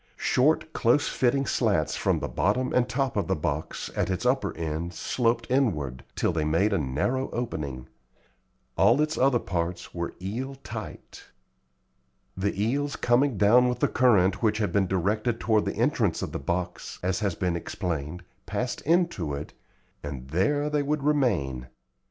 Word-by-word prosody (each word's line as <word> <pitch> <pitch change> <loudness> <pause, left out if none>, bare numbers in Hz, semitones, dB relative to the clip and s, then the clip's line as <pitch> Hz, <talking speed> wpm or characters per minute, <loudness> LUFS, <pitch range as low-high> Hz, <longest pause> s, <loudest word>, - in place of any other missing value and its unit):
Short, 155 +4 +2
close 120 +5 +3
fitting 135 +2 +1
slats 100 - +1
from - - 0
the - - -2
bottom 105 - 0
and 125 0 +2
top 130 +1 -1
of 100 - 0
the 95 - +1
box, 75 0 -3
at - - 0
its 95 +6 -2
upper 130 -6 +1
end, 80 +2 -3
sloped 115 -1 0
inward, 75 - 0
till - - +1
they 80 -2 0
made 85 +8 +2
a 100 - +2
narrow 80 - -1
opening. 70 - -4 0.9
All 115 +8 +5
its 155 +1 +1
other 130 -1 +3
parts 85 -4 -3
were 85 -1 -4
eel 120 +9 -4
tight. 110 -3 -8 1.1
The 100 +1 -2
eels 140 +7 0
coming 120 0 +2
down 120 +5 +5
with 125 - -1
the - - +2
current 100 -7 +3
which 110 -2 +2
had 105 -2 0
been 100 -2 +2
directed 105 +6 0
toward 110 -2 +2
the - - -2
entrance - - +1
of - - -4
the - - -4
box, 90 +5 -3
as 90 0 0
has 100 -5 -1
been 90 -1 -1
explained, 85 -1 -4 0.2
passed 125 0 -2
into 160 - +1
it, 70 - -7 0.5
and 70 -3 -7
there 125 - +1
they 150 -1 +2
would 145 0 -1
remain. 95 - +1
105 Hz, 165 wpm, -27 LUFS, 85-125 Hz, 1.1 s, All